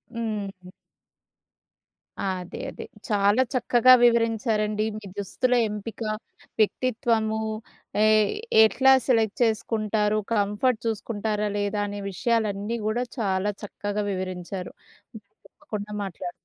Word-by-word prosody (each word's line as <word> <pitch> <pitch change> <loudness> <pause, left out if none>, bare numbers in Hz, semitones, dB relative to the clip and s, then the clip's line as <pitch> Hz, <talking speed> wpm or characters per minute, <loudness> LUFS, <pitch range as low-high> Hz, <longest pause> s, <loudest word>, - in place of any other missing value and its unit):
హ్మ్. 200 -5 -4 1.5
అదే 185 -2 -4
అదే. - - -8 0.2
చాలా 205 +3 +3
చక్కగా 250 0 +5
వివరించారండి. 220 -2 +1
మీ 215 - -10
దుస్తుల 245 +6 0 0.2
ఎంపిక, 210 +2 -7 0.6
వ్యక్తిత్వము 220 -1 +1 0.6
ఏ - - +6 0.6
ఎట్లా 265 +4 +5 0.2
సెలెక్ట్ 225 -5 +2
చేసుకుంటారు. 215 -1 0 0.2
కంఫర్ట్ 210 +3 +1
చూసుకుంటారా 210 -1 -2
లేదా, 205 0 -1
అనే 205 0 -5
విషయాలన్నీ 220 -1 -1
గూడా 235 +3 0 0.2
చాలా 195 -1 0
చక్కగా 205 0 -3
వివరించారు. 185 0 -5 0.8
తప్పకుండా 210 -1 -6
మాట్లాడు 180 -2 -5
210 Hz, 90 wpm, -25 LUFS, 200-230 Hz, 1.5 s, ఏ